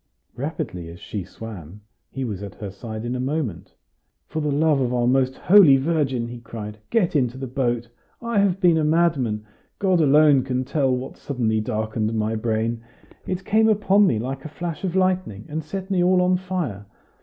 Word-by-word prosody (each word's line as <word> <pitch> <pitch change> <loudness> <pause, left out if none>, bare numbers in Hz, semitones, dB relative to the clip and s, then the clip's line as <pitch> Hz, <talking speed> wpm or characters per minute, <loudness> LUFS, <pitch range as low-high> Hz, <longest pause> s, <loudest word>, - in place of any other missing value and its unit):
Rapidly 105 - -4
as 85 +1 -11
she 100 -3 -5
swam, 100 -2 -10 0.3
he 135 -1 -4
was 100 -5 -4
at 100 -2 -8
her 100 -3 -7
side 110 +3 -7
in 120 +1 -2
a - - -3
moment. 130 - -3 0.5
"For 155 - -4
the 150 -1 0
love 150 -1 +2
of 125 -2 0
our 120 -1 +1
most 130 +1 +2
Holy 175 -8 +7
Virgin" 135 -5 0
he 120 0 -8
cried, 110 -2 -8
"get 190 -7 +1
into 125 -3 +1
the 135 - -4
boat! 120 -2 -1 0.3
I 235 -3 0
have 195 -2 +2
been 175 -4 +4
a - - +1
madman! 150 -10 +1 0.3
God 185 -4 +2
alone 145 -1 +5
can 130 0 -2
tell 140 0 +1
what 125 +1 -3
so - - -25
suddenly 110 -3 +1
darkened 110 0 -2
my 110 0 0
brain. 115 +1 -1 0.5
It 185 0 -3
came 220 +1 +4
upon 205 -1 +4
me 115 - +2
like 130 +4 -4
a 155 - -7
flash 170 +1 -5
of 185 -2 -2
lightning, 185 - 0
and 155 +1 -4
set 190 +5 -6
me 180 -2 +2
all 185 +1 +4
on 180 0 +3
fire. 175 - -4
135 Hz, 195 wpm, -23 LUFS, 115-170 Hz, 0.5 s, Holy